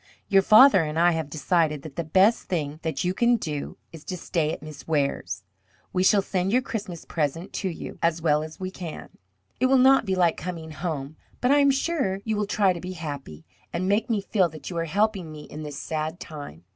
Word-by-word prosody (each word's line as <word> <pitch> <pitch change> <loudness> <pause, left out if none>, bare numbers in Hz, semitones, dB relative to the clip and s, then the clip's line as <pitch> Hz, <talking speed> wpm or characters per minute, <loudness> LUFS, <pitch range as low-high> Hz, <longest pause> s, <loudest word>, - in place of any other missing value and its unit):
Your 195 -1 +6
father 215 +1 +7
and 150 0 -3
I 175 +1 +5
have 160 -3 -2
decided 150 0 0
that 150 -3 -9
the 170 - -2
best 190 +8 +3
thing 155 -4 -2
that 160 -4 -2
you 180 +1 0
can 240 +4 +3
do 150 -9 -4
is 160 -2 -11
to 185 - -4
stay 165 -2 -1
at 155 - -6
Miss 155 -2 -10
Ware's. 140 -9 -1 0.5
We 185 - +1
shall 195 +1 +4
send 190 0 -1
your 250 +3 +3
Christmas 200 -9 -5
present 165 +3 -2
to 190 - -1
you 165 - -7
as 170 0 +2
well 150 -2 +2
as 155 0 -8
we 185 0 -4
can. 175 -4 -7 0.5
It 255 - +4
will 270 +1 +5
not 265 -2 +5
be 190 - +1
like 175 -3 +2
coming 165 -2 -6
home, 155 -2 -4 0.2
but 250 - +2
I 290 - +5
am 280 0 +5
sure 270 - 0
you 220 -1 0
will 210 -1 -1
try 200 -2 +3
to 170 - -7
be 185 +1 -5
happy, 140 - -7 0.3
and 180 +2 -2
make 210 +5 +1
me 215 -3 +1
feel 195 -3 +1
that 155 +3 -9
you 170 - -4
are 165 - -1
helping 195 -1 0
me 155 -1 -9
in 150 - -9
this 150 -2 -6
sad 155 +1 -3
time. 145 - -9
170 Hz, 225 wpm, -25 LUFS, 155-195 Hz, 0.5 s, father